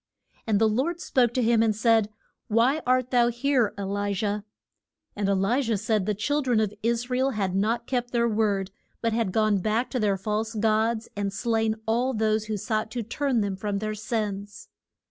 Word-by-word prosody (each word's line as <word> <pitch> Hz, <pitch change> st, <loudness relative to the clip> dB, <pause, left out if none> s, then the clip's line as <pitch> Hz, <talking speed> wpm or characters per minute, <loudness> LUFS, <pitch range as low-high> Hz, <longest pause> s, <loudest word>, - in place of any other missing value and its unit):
And 215 Hz, -2 st, +3 dB
the 220 Hz, -, +4 dB
Lord 270 Hz, +11 st, 0 dB
spoke 245 Hz, -8 st, +2 dB
to 255 Hz, -, +2 dB
him, 230 Hz, 0 st, +3 dB
and 220 Hz, -2 st, +2 dB
said, 220 Hz, -1 st, +3 dB, 0.4 s
Why 240 Hz, +8 st, +2 dB
art 255 Hz, 0 st, +2 dB
thou 240 Hz, -2 st, +4 dB
here, 240 Hz, -1 st, +1 dB
E 200 Hz, -, -4 dB
li 200 Hz, +1 st, -1 dB
jah? 205 Hz, +1 st, -2 dB, 0.7 s
And 205 Hz, -1 st, -1 dB
E -, -, +3 dB
li 195 Hz, +8 st, +1 dB
jah 230 Hz, -4 st, 0 dB
said 215 Hz, -2 st, 0 dB
the 210 Hz, -, +1 dB
chil 290 Hz, +9 st, 0 dB
dren 250 Hz, -5 st, +1 dB
of 210 Hz, -2 st, 0 dB
Is 235 Hz, +2 st, -1 dB
ra 250 Hz, -, +1 dB
el 265 Hz, +1 st, +2 dB
had 195 Hz, -4 st, -1 dB
not 225 Hz, +5 st, 0 dB
kept 245 Hz, -1 st, -2 dB
their 235 Hz, -1 st, +2 dB
word, 205 Hz, -3 st, 0 dB, 0.3 s
but 230 Hz, -1 st, 0 dB
had 225 Hz, -4 st, 0 dB
gone 215 Hz, -1 st, +2 dB
back 220 Hz, +5 st, -1 dB
to 255 Hz, -, -1 dB
their 205 Hz, -3 st, +1 dB
false 215 Hz, +3 st, -2 dB
gods, 220 Hz, +1 st, +1 dB
and 200 Hz, -1 st, -2 dB
slain 225 Hz, 0 st, 0 dB
all 245 Hz, +3 st, +1 dB
those 215 Hz, 0 st, +1 dB
who 215 Hz, -1 st, -3 dB
sought 215 Hz, +2 st, -2 dB
to 235 Hz, +1 st, -4 dB
turn 250 Hz, +2 st, 0 dB
them 200 Hz, -2 st, -1 dB
from 200 Hz, +1 st, -3 dB
their 215 Hz, +1 st, -3 dB
sins. 210 Hz, -2 st, -4 dB
220 Hz, 205 wpm, -26 LUFS, 210-235 Hz, 0.7 s, the